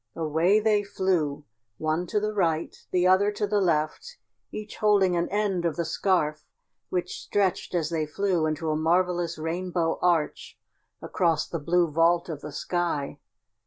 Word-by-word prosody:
Away 165 +6 +2
they 215 -1 +2
flew 180 -7 -1 0.3
one 160 +3 -1
to 210 - 0
the 215 +1 -2
right, 165 -5 0
the 180 -1 +1
other 190 +3 +4
to 210 0 -1
the 205 0 +1
left, 175 - -1 0.3
each 215 -1 -7
holding 200 -4 +3
an 170 0 0
end 200 -3 0
of 165 -3 0
the 170 - -2
scarf 155 -4 0 0.5
which 180 -1 -3
stretched 190 -2 -1
as 165 -2 0
they 155 -2 -1
flew 175 0 0
into 155 +1 -2
a - - 0
marvelous 175 +1 +1
rainbow 170 +1 -2
arch 170 -4 0 0.5
across 165 -4 0
the 170 - -4
blue 170 +3 +2
vault 170 +3 +2
of 150 -3 -5
the 150 - -7
sky. 150 -3 -2
175 Hz, 160 wpm, -26 LUFS, 160-190 Hz, 0.5 s, other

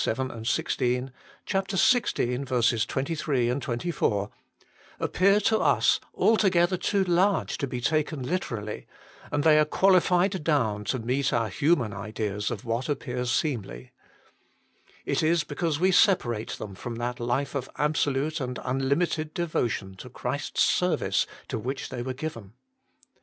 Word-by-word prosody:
7, 120 -1 -2
16; 125 +3 0 0.3
xvi. 130 - +1
23, 140 -3 -1 0.2
24), 120 - -1 0.7
appear 200 +2 +3
to 220 +1 +2
us - - +3 0.2
altogether 185 -5 +3
too 195 +2 +1
large 185 +2 +2
to 140 - -1
be 125 -1 -4
taken 150 +2 0
literally, 120 - -4 0.4
and 145 0 0
they 155 -1 +6
are - - +6
qualified 185 +1 +3
down 115 -10 +1
to 130 - -1
meet 130 +4 0
our 115 -2 0
human 125 - +1
ideas 105 0 -3
of - - -6
what 115 +5 -2
appears 125 -3 -2
seemly. 100 - -2 1.1
It - - 0
is 160 0 +2
because 150 +1 -2
we 185 +2 +3
separate 125 - +2
them 100 - -7
from 115 +5 -6
that 120 +2 -3
life 120 +4 -1
of 135 -3 -3
absolute 150 +1 0
and 125 -1 -3
unlimited 140 +5 0
devotion 120 - -1
to - - -10
Christ - - -4
s - - +5
ser - - +2
vice - - 0 0.2
to - - -3
which 130 +5 -4
they 120 - -5
were 130 +1 -4
given. 115 -9 -6
135 Hz, 135 wpm, -27 LUFS, 120-165 Hz, 1.1 s, they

